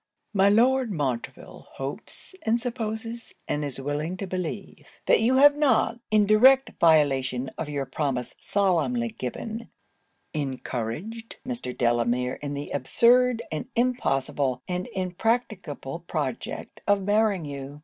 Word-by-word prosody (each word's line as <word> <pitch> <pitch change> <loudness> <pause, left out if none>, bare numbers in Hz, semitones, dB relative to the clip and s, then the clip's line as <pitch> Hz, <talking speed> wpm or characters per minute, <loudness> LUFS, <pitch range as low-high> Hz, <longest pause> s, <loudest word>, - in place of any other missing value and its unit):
'My 200 0 +5
Lord 245 +3 +3
Montreville 135 -9 -4
hopes 140 - -7
and 230 +2 +1
supposes, 230 -1 -5
and 150 - -1
is 140 -2 -4
willing 150 +6 -3
to 195 - -4
believe, 185 +1 -5 0.2
that - - +5
you 245 +4 +3
have 285 +2 +7
not, 290 -4 +2
in 215 -1 +4
direct 260 +6 +6
violation 135 -5 +3
of 155 - -4
your 140 -2 -2
promise 130 -2 -2
solemnly 155 - +1
given, 215 - -6 0.6
encouraged 145 - -4
Mr. 240 - -4
Delamere 120 +1 +1
in 145 -1 -4
the 145 +1 -6
absurd, 245 - +3
and 155 -1 -4
impossible, 135 - 0
and 180 0 -3
impracticable 185 - -2
project 140 -7 -4
of 205 -1 +3
marrying 205 -3 +2
you. 140 0 -7
175 Hz, 125 wpm, -26 LUFS, 135-225 Hz, 0.6 s, have